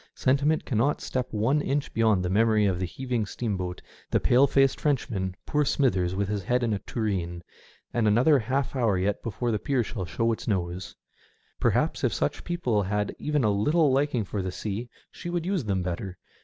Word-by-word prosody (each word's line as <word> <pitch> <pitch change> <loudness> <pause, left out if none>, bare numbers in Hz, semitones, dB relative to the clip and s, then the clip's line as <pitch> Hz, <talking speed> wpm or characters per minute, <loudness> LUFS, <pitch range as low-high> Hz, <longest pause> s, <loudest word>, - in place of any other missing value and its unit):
Sentiment 140 +4 +2
cannot 130 +4 +1
step 130 -1 -2
one 115 +8 +1
inch 140 0 -2
beyond 110 -5 +2
the - - 0
memory 110 +1 +3
of 95 -3 +1
the 95 - -1
heaving 125 +2 -2
steamboat, 95 -4 -4 0.3
the - - +2
pale 130 +3 +4
faced 135 0 +2
Frenchman, 105 -10 -1
poor 150 0 +1
Smithers 95 -11 +1
with 100 0 0
his 105 0 -2
head 125 +6 0
in 115 -2 +1
a 100 - -1
tureen, 90 -8 -3 0.5
and 115 -2 +2
another 125 +8 +5
half 135 +4 -1
hour 115 -7 +2
yet 95 +2 0
before 120 +2 -2
the 105 - 0
pier 130 0 0
shall 105 -4 -5
show 115 +6 0
its 110 - -4
nose. 90 -3 -2 0.6
Perhaps - - +1
if - - +1
such - - -1
people 130 -12 0
had 105 +1 -1
even 150 -3 0
a 105 - +3
little 150 +9 +3
liking 135 -4 +1
for 100 +1 -3
the 95 0 -3
sea 110 +5 -4 0.2
she 175 - -7
would 175 -1 -2
use 185 - -1
them 95 -3 0
better. 90 +1 -4
110 Hz, 195 wpm, -27 LUFS, 100-135 Hz, 0.6 s, another